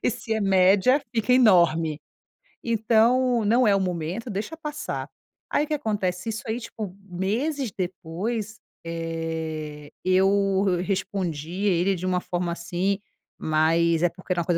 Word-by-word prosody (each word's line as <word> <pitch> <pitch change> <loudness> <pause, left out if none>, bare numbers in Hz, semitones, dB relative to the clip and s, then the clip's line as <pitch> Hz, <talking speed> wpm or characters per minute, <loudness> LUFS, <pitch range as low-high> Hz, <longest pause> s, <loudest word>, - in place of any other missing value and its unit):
e - - +2
se 230 -1 -4
é 220 - -1
média, 195 +7 +4
fica 230 +2 +2
enorme. 170 - +4 0.6
Então, 235 +2 +3
não 235 +2 +4
é 200 - +5
o 195 - +2
momento, 180 +6 -3
deixa 210 +11 -4
passar.". 300 -1 -5 0.4
Aí, - - +2
o - - -17
que 310 - -2
acontece, 205 -9 -2
isso 220 - -4
aí, 225 +2 -1
tipo, 215 -5 -7 0.2
meses 230 - -1
depois, 195 +5 -4 0.3
eh, 160 -2 -4
eu 195 +1 +3
re 175 - -1
respondi 185 -2 -2
ele 190 0 +2
de 180 - -5
uma 185 -1 +1
forma, 175 -1 -2
assim, 180 +3 -1 0.4
mas, 165 +1 +2
é 175 - +4
porque 185 +1 -4
era 175 - 0
uma 170 - -4
coisa 175 -2 +1
190 Hz, 150 wpm, -25 LUFS, 170-220 Hz, 0.6 s, é